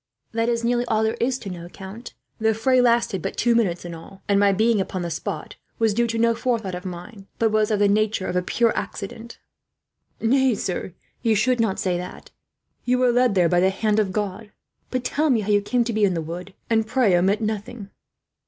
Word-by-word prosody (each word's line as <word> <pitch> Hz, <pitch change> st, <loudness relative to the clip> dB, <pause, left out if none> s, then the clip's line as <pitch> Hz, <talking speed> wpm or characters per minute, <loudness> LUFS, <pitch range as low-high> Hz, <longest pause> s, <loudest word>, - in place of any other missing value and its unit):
"That 230 Hz, +1 st, 0 dB
is 235 Hz, 0 st, 0 dB
nearly 240 Hz, +1 st, +1 dB
all 220 Hz, -2 st, +1 dB
there 220 Hz, 0 st, +1 dB
is 250 Hz, +2 st, +1 dB
to 205 Hz, -, -8 dB
know, 175 Hz, -1 st, -8 dB
count. 195 Hz, +6 st, -10 dB, 0.2 s
The 220 Hz, 0 st, +2 dB
fray 255 Hz, +3 st, +3 dB
lasted 235 Hz, -6 st, +2 dB
but -, -, -4 dB
two 240 Hz, 0 st, +3 dB
minutes, 190 Hz, -7 st, 0 dB
in 170 Hz, -, -6 dB
all; 180 Hz, +4 st, -12 dB
and 200 Hz, -1 st, +3 dB
my 200 Hz, 0 st, +5 dB
being 215 Hz, +1 st, +2 dB
upon 185 Hz, -1 st, -4 dB
the 170 Hz, -, -4 dB
spot 165 Hz, 0 st, -5 dB, 0.2 s
was 225 Hz, -2 st, +2 dB
due 235 Hz, +2 st, +1 dB
to 230 Hz, 0 st, -2 dB
no 230 Hz, 0 st, +3 dB
forethought 225 Hz, -5 st, -2 dB
of 180 Hz, +1 st, -6 dB
mine, 185 Hz, +3 st, -8 dB
but 225 Hz, -1 st, +2 dB
was 215 Hz, -1 st, +2 dB
of 215 Hz, -, +1 dB
the 205 Hz, 0 st, +3 dB
nature 210 Hz, -1 st, +1 dB
of -, -, -3 dB
a 180 Hz, -, +2 dB
pure 230 Hz, +5 st, +1 dB
accident." 225 Hz, +3 st, -6 dB, 0.8 s
"Nay, 260 Hz, +1 st, +3 dB
sir, 185 Hz, -2 st, -4 dB, 0.3 s
you 225 Hz, -2 st, +2 dB
should 245 Hz, +4 st, +2 dB
not 220 Hz, -4 st, +1 dB
say 180 Hz, -2 st, 0 dB
that; 180 Hz, +1 st, -9 dB, 0.5 s
you 250 Hz, +1 st, +2 dB
were 250 Hz, -1 st, +3 dB
led 245 Hz, -3 st, +3 dB
there 180 Hz, -2 st, +4 dB
by 175 Hz, +1 st, +2 dB
the 190 Hz, +1 st, +4 dB
hand 210 Hz, +2 st, 0 dB
of 200 Hz, -3 st, +1 dB
God. 205 Hz, +1 st, -4 dB, 0.4 s
But 255 Hz, -1 st, -2 dB
tell 300 Hz, +4 st, 0 dB
me 235 Hz, -5 st, +3 dB
how 210 Hz, -, -5 dB
you 205 Hz, 0 st, +4 dB
came 240 Hz, +4 st, +1 dB
to 235 Hz, 0 st, -3 dB
be 215 Hz, -1 st, +1 dB
in 190 Hz, -3 st, +3 dB
the -, -, -1 dB
wood, 180 Hz, +4 st, -7 dB
and 225 Hz, -1 st, +1 dB
pray 225 Hz, -5 st, +3 dB
omit 190 Hz, +4 st, +2 dB
nothing." 215 Hz, -1 st, -4 dB
215 Hz, 225 wpm, -23 LUFS, 190-235 Hz, 0.8 s, my